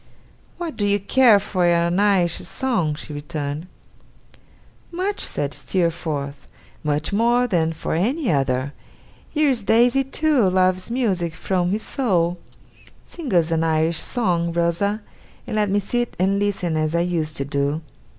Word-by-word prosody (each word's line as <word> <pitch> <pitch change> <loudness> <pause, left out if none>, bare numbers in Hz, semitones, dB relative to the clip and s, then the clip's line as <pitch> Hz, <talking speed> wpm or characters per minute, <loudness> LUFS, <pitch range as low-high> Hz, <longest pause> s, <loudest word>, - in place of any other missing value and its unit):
'What 340 -3 -5
do 205 - 0
you 205 0 +2
care 225 +1 +5
for 190 -2 -2
an 170 +1 +2
Irish 190 -5 +3
song?' 180 - -1
she 150 - -8
returned. 145 +2 -5 1.2
'Much!' 375 +4 -2
said 145 -1 -1
Steerforth. 160 -6 -2 0.4
'Much 150 +4 -1
more 240 +4 +3
than 170 -8 +1
for 160 - -4
any 240 - 0
other. 135 -1 0 0.6
Here 305 -1 +2
is 250 -4 0
Daisy, 240 +6 +3
too, 270 -5 +2
loves 185 +1 +1
music 190 -10 -1
from 180 0 -1
his 210 +3 -1
soul. 180 -9 0 0.7
Sing 320 -8 -7
us 170 -3 +2
an 165 0 +1
Irish 160 0 +1
song, 175 -8 0
Rosa! 170 +5 0 0.4
and - - -4
let 210 -1 +1
me 200 +1 +2
sit 240 +4 -2
and 195 +2 +1
listen 190 -5 -1
as 155 +1 0
I 170 - +2
used 165 -3 -1
to 140 - -1
do. 140 +2 -1
180 Hz, 150 wpm, -22 LUFS, 160-220 Hz, 1.2 s, care